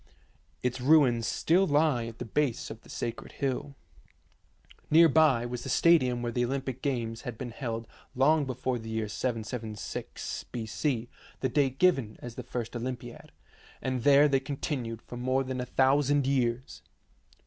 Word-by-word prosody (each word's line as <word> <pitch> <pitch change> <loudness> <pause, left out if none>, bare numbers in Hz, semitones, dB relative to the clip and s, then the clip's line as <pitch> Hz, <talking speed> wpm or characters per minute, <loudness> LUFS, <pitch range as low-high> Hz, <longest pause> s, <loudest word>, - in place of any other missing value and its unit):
Its 125 0 -1
ruins 130 -5 +4
still 185 +4 +2
lie 145 -5 +2
at 115 0 -9
the 125 - -5
base 135 +1 -1
of 110 +1 -9
the - - -19
sacred 115 -1 -5
hill. 140 +1 -3 1.1
Near 165 +2 +7
by 150 -6 +4
was 120 0 -4
the - - -6
stadium 130 -8 +4
where 120 - -1
the 120 +1 0
Olympic 130 0 -3
games 120 -4 -2
had 120 -3 -6
been 125 -1 -5
held 115 -2 -4 0.3
long 145 +3 +4
be 130 - -3
fore 130 0 -2
the 110 0 -8
year 110 -1 -2
776 110 0 -4
B.C., 115 +2 -2 0.3
the 130 - +1
date 135 0 +1
given 135 -12 +2
as 120 -1 -8
the - - -6
first 120 -1 -5
Olympiad, 120 0 -6 0.5
and 130 -2 -2
there 145 +3 +6
they 135 -2 +2
continued 135 -4 -4
for 120 - -9
more 130 +2 +1
than 130 -1 -3
a 125 - -5
thousand 140 +1 +3
years. 125 -2 -1
125 Hz, 160 wpm, -29 LUFS, 120-140 Hz, 1.1 s, Near